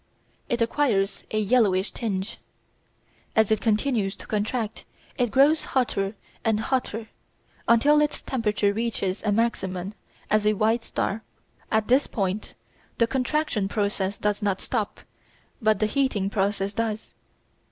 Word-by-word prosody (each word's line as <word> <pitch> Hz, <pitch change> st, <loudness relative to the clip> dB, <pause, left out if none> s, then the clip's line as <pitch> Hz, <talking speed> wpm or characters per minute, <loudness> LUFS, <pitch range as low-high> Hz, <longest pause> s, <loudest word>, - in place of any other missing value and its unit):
It 240 Hz, -1 st, +2 dB
acquires 230 Hz, -6 st, +1 dB
a 215 Hz, -, -2 dB
yellowish 210 Hz, -3 st, +3 dB
tinge. 200 Hz, -3 st, -3 dB, 1.0 s
As 220 Hz, -1 st, +4 dB
it 220 Hz, -, +2 dB
continues 215 Hz, -3 st, +1 dB
to -, -, -10 dB
contract 220 Hz, +1 st, -2 dB, 0.3 s
it 245 Hz, -2 st, +1 dB
grows 280 Hz, +7 st, +4 dB
hotter 200 Hz, -5 st, 0 dB, 0.3 s
and 220 Hz, -2 st, +2 dB
hotter 225 Hz, -2 st, -1 dB, 0.6 s
until 285 Hz, +6 st, +5 dB
its 295 Hz, 0 st, -1 dB
temperature 210 Hz, -5 st, +1 dB
reaches 210 Hz, -4 st, -1 dB
a 210 Hz, -, 0 dB
maximum 195 Hz, -4 st, -1 dB, 0.4 s
as 215 Hz, 0 st, +3 dB
a 215 Hz, -, +5 dB
white 225 Hz, +3 st, +2 dB
star. 220 Hz, 0 st, -2 dB, 0.5 s
At 220 Hz, -1 st, +2 dB
this 260 Hz, +3 st, +4 dB
point 195 Hz, 0 st, -2 dB, 0.4 s
the 230 Hz, -, +4 dB
contraction 255 Hz, -3 st, 0 dB
process 200 Hz, -1 st, -1 dB
does 210 Hz, +1 st, -1 dB
not 200 Hz, -2 st, 0 dB
stop, 220 Hz, -5 st, -3 dB, 0.6 s
but 215 Hz, -1 st, +3 dB
the 215 Hz, -, +1 dB
heating 215 Hz, -5 st, 0 dB
process 200 Hz, 0 st, 0 dB
does. 220 Hz, 0 st, -3 dB
215 Hz, 130 wpm, -25 LUFS, 200-235 Hz, 1.0 s, until